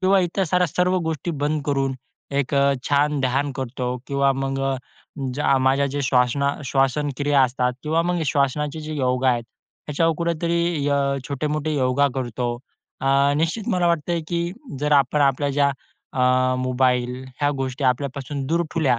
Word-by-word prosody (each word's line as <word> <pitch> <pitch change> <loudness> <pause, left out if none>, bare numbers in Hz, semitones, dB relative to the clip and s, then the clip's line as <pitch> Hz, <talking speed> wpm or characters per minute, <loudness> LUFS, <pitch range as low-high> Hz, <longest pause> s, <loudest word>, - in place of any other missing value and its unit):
किंवा 190 +1 +4
इतर 180 +2 0
साऱ्या 180 +1 +2
सर्व 180 +4 +1
गोष्टी 160 +1 -2
बंद 150 0 0
करून 135 -2 0 0.4
एक 140 +1 -1
अ, 140 0 +4 0.2
छान 145 0 +2
ध्यान 135 +2 0
करतो 125 -1 -3
किंवा 140 0 +2
मग 135 0 -2
अ, - - -3 0.6
ज्या 140 0 +2
माझ्या 135 +2 +3
जे 145 +1 -3
श्वासना 130 +2 +2
श्वासनक्रिया 140 +1 +2
असतात 125 0 +1
किंवा 160 +2 +1
मग 175 0 0
श्वासनाचे 145 +2 0
जे 155 0 -5
योग 130 -2 0
आहेत, 120 -2 +2 0.4
ह्याच्यावर 165 +2 +2
कुठेतरी 170 -2 0
अ, 140 0 +2 0.3
छोटे-मोठे 150 +2 -2
योगा 130 +1 +2
करतो 120 -2 -2 0.5
अ, 140 +1 +3
निश्चित 165 +7 -1
मला 180 -1 +2
वाटतंय, 170 0 0
की 170 0 -1 0.3
जर 150 0 +1
आपण 140 +1 +3
आपल्या 140 +1 +2
ज्या 140 0 +2 0.4
अ, 130 0 +2
मोबाईल 125 0 0 0.2
ह्या 145 0 +3
गोष्टी 130 +1 -3
आपल्यापासून 135 +2 -1
दूर 170 +4 +1
ठेवल्या. 135 -7 +2
140 Hz, 155 wpm, -23 LUFS, 130-155 Hz, 0.6 s, किंवा